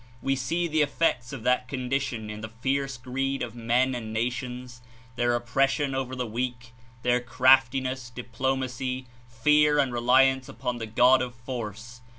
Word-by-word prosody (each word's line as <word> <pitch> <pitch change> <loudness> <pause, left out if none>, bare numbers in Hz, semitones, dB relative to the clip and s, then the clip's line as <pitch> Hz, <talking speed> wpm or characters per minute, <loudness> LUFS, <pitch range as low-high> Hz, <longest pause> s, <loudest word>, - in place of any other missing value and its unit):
We 135 +1 0
see 165 +7 -1
the 155 -1 +1
effects 145 -4 0
of 135 -5 -7
that 125 +1 +2
condition 125 -4 -2
in 105 0 -7
the 110 - -6
fierce 135 +4 -2
greed 135 +2 -2
of 120 -3 -5
men 120 +3 +1
and 115 -3 -5
nations, 125 +2 -4 0.3
their 120 0 +1
oppression 135 +3 +1
over 130 -1 -3
the 125 -1 -2
weak, 120 +1 -4 0.3
their 125 0 +3
craftiness, 130 +1 +3
diplomacy, 130 +1 -3 0.2
fear 150 +5 +3
and 140 -3 +2
reli 125 +2 +5
ance 130 -1 -10
upon 120 +1 -4
the 115 - -4
god 125 +4 +5
of 125 -1 -4
force. 120 0 -7
125 Hz, 160 wpm, -27 LUFS, 120-135 Hz, 0.3 s, reli